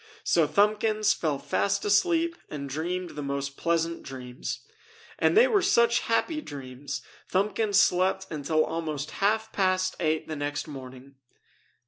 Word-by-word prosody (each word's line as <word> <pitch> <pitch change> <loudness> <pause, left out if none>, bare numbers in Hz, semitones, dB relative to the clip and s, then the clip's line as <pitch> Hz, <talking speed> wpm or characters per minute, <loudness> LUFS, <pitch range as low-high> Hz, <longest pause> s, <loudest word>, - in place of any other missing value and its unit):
So 165 -3 +3
Thumbkins 215 +5 +2
fell 150 -4 -1
fast 100 -6 0
asleep 335 - +3
and 140 -2 -5
dreamed 175 +6 -3
the 150 - -6
most 140 0 -3
pleasant 165 +1 0
dreams. 125 -1 -6 0.6
And - - +3
they 465 - +8
were 410 -3 +3
such 235 -4 +4
happy 305 +7 0
dreams 135 - -7 0.3
Thumbkins 205 +2 +1
slept 190 0 +2
until 155 +1 +1
almost 155 -3 -4
half 220 +2 +2
past 185 -1 +1
eight 155 -1 0
the 155 - -4
next 145 +2 -3
morning. 130 -1 -10
165 Hz, 135 wpm, -27 LUFS, 145-210 Hz, 0.6 s, they